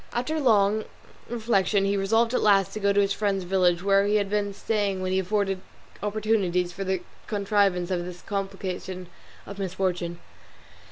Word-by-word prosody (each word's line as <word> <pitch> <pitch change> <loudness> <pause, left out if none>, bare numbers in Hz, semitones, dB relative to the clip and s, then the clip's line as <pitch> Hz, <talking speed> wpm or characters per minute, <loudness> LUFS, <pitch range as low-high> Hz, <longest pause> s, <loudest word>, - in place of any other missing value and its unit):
After 255 +7 -1
long 215 -5 +3 0.4
reflection 215 -4 +1
he 200 +1 +1
resolved 225 +4 +2
at - - +2
last 195 -3 +4
to - - -4
go 200 -1 +2
to 205 0 +3
his 200 0 +1
friend's 200 -2 0
village, 180 -1 +2
where 200 0 +4
he 210 - +2
had 200 -1 +1
been 205 -1 0
staying 200 -2 -1
when 185 - -1
he 190 - +2
afforded 195 0 0 0.4
opportunities 205 -4 0
for 195 - -5
the 190 -1 -1 0.2
contrivance 200 -4 +1
of 175 -1 0
this 180 0 -9
complication 190 -2 -4 0.4
of 200 0 -9
misfortune. 180 -2 -2
195 Hz, 165 wpm, -26 LUFS, 185-210 Hz, 0.4 s, last